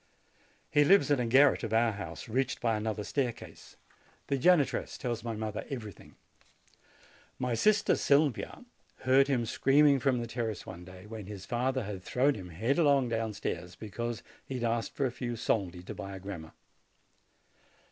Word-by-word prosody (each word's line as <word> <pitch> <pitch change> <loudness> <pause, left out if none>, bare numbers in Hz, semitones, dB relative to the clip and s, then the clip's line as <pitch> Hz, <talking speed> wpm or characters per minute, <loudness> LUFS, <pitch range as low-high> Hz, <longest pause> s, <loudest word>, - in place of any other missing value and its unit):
He 145 - +5
lives 190 0 +5
in 145 - +3
a 120 - 0
garret 135 +4 +5
of 110 -1 -3
our 115 0 +4
house, 95 -6 -7
reached 130 +3 -1
by 115 -2 +1
another 105 0 -2
staircase. 125 +1 -4 0.5
The - - 0
90 135 - -1
JANUARY 175 -5 +6
janitress - - -5
tells 120 -3 -3
my 115 -2 -3
mother 110 -1 -4
everything. 110 -8 -8 1.2
My 125 -1 -1
sister 210 - +3
Sylvia 145 - +1 0.4
heard 135 +2 +4
him 125 -4 +1
screaming 140 +4 +4
from 130 -1 +1
the 120 - -3
terrace 115 -4 -4
one 90 -1 -9
day, 90 +1 -12
when 105 -2 -8
his 100 -2 -8
father 130 +3 -1
had 100 -2 -6
thrown 130 +9 +2
him 95 -6 -8
headlong 135 - +2
downstairs, 105 -6 -3
because 115 +2 -5 0.2
he 135 - -6
had 125 - -3
asked 115 0 -1
for 140 - 0
a 130 - 0
few 120 -1 -4
soldi 95 -6 -1
to - - -7
buy 100 0 -7
a - - -7
grammar. 90 -5 -8
120 Hz, 170 wpm, -30 LUFS, 105-135 Hz, 1.2 s, JANUARY